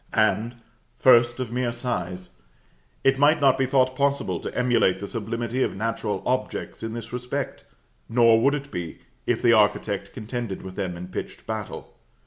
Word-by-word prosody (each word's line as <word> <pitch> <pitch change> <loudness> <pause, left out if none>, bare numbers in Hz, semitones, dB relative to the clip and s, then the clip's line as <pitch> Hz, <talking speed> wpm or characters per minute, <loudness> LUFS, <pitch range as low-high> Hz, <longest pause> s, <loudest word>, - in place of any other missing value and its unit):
And, 110 +2 +2 0.4
first 120 -1 +5
of 125 -3 -3
mere 125 0 0
size: 95 -7 -4 0.7
It 135 0 +3
might 150 +2 +5
not 135 -2 +5
be 135 - +2
thought 130 -1 +2
possible 140 -11 0
to - - -6
emulate 120 -7 +3
the 100 - -5
sublimity 115 +3 -3
of - - 0
natural 105 -2 -2
objects 130 +1 -2
in 115 0 -4
this 115 0 -7
respect; 125 +3 -4 0.4
nor 115 -1 +5
would 140 +4 +4
it 140 -1 -6
be, 85 -2 -6 0.3
if - - 0
the 115 - +6
architect 105 -2 +2
contended 115 -3 -5
with 95 -1 -8
them 90 -3 -3
in 90 +1 -8
pitched - - -6
battle. - - -6
120 Hz, 165 wpm, -25 LUFS, 105-130 Hz, 0.7 s, the